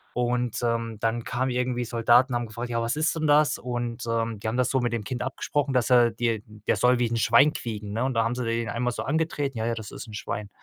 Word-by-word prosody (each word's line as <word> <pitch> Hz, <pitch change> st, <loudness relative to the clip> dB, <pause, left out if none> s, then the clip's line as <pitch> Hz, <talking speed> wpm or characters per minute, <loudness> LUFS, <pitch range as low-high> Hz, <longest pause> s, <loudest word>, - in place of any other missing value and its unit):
Und, 125 Hz, -1 st, 0 dB
ähm, 115 Hz, -1 st, -1 dB
dann 115 Hz, +1 st, -1 dB
kamen 130 Hz, +1 st, -1 dB
irgendwie 125 Hz, -1 st, -1 dB
Soldaten, 120 Hz, +2 st, +3 dB
haben 120 Hz, -1 st, -1 dB
gefragt: 120 Hz, +2 st, -6 dB
„Ja, 115 Hz, -1 st, -1 dB
was 115 Hz, +4 st, -1 dB
ist 155 Hz, +1 st, +1 dB
denn 155 Hz, -1 st, -1 dB
das?“ 150 Hz, 0 st, +4 dB
Und, 120 Hz, -1 st, -4 dB
ähm, 115 Hz, -1 st, -1 dB
die 105 Hz, -, -5 dB
haben 110 Hz, +3 st, -1 dB
das 125 Hz, 0 st, +2 dB
so 130 Hz, -, +1 dB
mit 120 Hz, -, 0 dB
dem 115 Hz, -, -2 dB
Kind 125 Hz, +1 st, -4 dB
abgesprochen, 140 Hz, +2 st, -2 dB
dass 125 Hz, -1 st, +2 dB
er, 120 Hz, -1 st, +6 dB
die 115 Hz, -2 st, -1 dB, 0.2 s
der -, -, +3 dB
soll 125 Hz, 0 st, +3 dB
wie 120 Hz, -, +2 dB
'n 115 Hz, -, -1 dB
Schwein 115 Hz, +8 st, +5 dB
quieken, 105 Hz, -3 st, -5 dB
ne? 115 Hz, -, -1 dB
Und 130 Hz, -1 st, -1 dB
da 115 Hz, -, +3 dB
haben 115 Hz, +2 st, -1 dB
sie 125 Hz, -, -3 dB
den 115 Hz, -1 st, -1 dB
einmal 125 Hz, +1 st, -1 dB
so -, -, -4 dB
angetreten, 145 Hz, -3 st, -1 dB
„Ja, 110 Hz, -, -1 dB
ja, 115 Hz, -, 0 dB
das 110 Hz, -2 st, -7 dB
ist -, -, -8 dB
'n 110 Hz, -, -11 dB
Schwein.“ 105 Hz, -1 st, -5 dB
120 Hz, 265 wpm, -26 LUFS, 115-125 Hz, 0.2 s, er